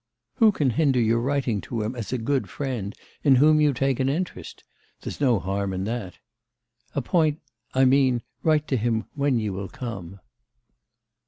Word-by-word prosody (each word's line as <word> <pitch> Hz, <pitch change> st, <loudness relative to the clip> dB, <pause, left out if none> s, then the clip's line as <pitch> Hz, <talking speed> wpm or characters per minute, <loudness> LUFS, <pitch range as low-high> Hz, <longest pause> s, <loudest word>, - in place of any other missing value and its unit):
Who 225 Hz, -3 st, +6 dB
can 145 Hz, -9 st, +1 dB
hinder 140 Hz, -1 st, +2 dB
your 115 Hz, 0 st, +2 dB
writing 125 Hz, -4 st, 0 dB
to 115 Hz, -3 st, -4 dB
him 110 Hz, +4 st, -3 dB
as 115 Hz, -4 st, -5 dB
a 130 Hz, -, 0 dB
good 130 Hz, +4 st, -1 dB
friend, 120 Hz, -8 st, -4 dB, 0.3 s
in 140 Hz, -3 st, +6 dB
whom 155 Hz, +3 st, +5 dB
you 150 Hz, -1 st, +4 dB
take 135 Hz, 0 st, 0 dB
an 130 Hz, 0 st, +2 dB
interest? 150 Hz, -, -4 dB, 0.4 s
There's -, -, -7 dB
no 125 Hz, -5 st, +4 dB
harm 95 Hz, +2 st, -2 dB
in 95 Hz, 0 st, -2 dB
that. 105 Hz, -3 st, -4 dB, 0.8 s
Appoint 155 Hz, +2 st, +1 dB, 0.4 s
I 130 Hz, 0 st, +5 dB
mean, 130 Hz, -2 st, +3 dB, 0.2 s
write 155 Hz, -2 st, +2 dB
to 130 Hz, -, +2 dB
him 115 Hz, 0 st, 0 dB
when 140 Hz, -3 st, +1 dB
you 105 Hz, -3 st, -2 dB
will 95 Hz, +1 st, -5 dB
come. 100 Hz, -6 st, -7 dB
125 Hz, 170 wpm, -25 LUFS, 110-140 Hz, 0.8 s, Who